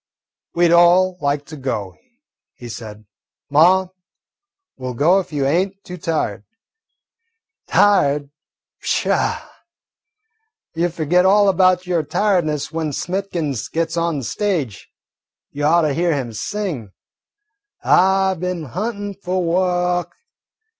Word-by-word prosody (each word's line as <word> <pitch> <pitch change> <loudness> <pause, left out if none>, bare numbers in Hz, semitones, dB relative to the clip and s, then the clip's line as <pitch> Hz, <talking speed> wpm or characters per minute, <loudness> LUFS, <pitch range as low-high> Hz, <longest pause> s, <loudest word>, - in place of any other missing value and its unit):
"We 175 0 +4
'd - - +1
all 180 +2 +4
like 145 0 -1
to 155 - -10
go," 115 -9 -4 0.6
he 120 - -10
said. 110 -2 -9 0.5
"Ma, 180 +6 +5 0.9
we' 130 -1 -7
ll 125 - -4
go 170 +9 +4
if 190 - -6
you 145 -3 -1
ain't 185 +7 +1
too 180 - -8
tired." 150 - -2 1.2
"Tired? 145 -8 +3 0.5
Pshaw, - - 0 1.3
you 170 +2 +1
'll - - -7
furgit 170 +2 +2
all 200 +1 +5
about 185 -1 +3
your 175 -2 0
tiredness 155 -4 0
when 160 -2 -3
Smithkins 170 - -3
gits 165 0 -1
on 170 -2 0
the 135 - -4
stage. 150 - -2 0.6
Y' 145 - -6
ought 160 +4 +4
to 150 -2 +1
hear 170 +1 +1
him 125 -5 -4
sing, 150 - -4 0.9
'I 190 0 +3
bin 180 -2 -3
huntin' 205 0 -3
fu' 185 -1 -4
wo'k'! 180 0 0
170 Hz, 125 wpm, -20 LUFS, 145-185 Hz, 1.3 s, Ma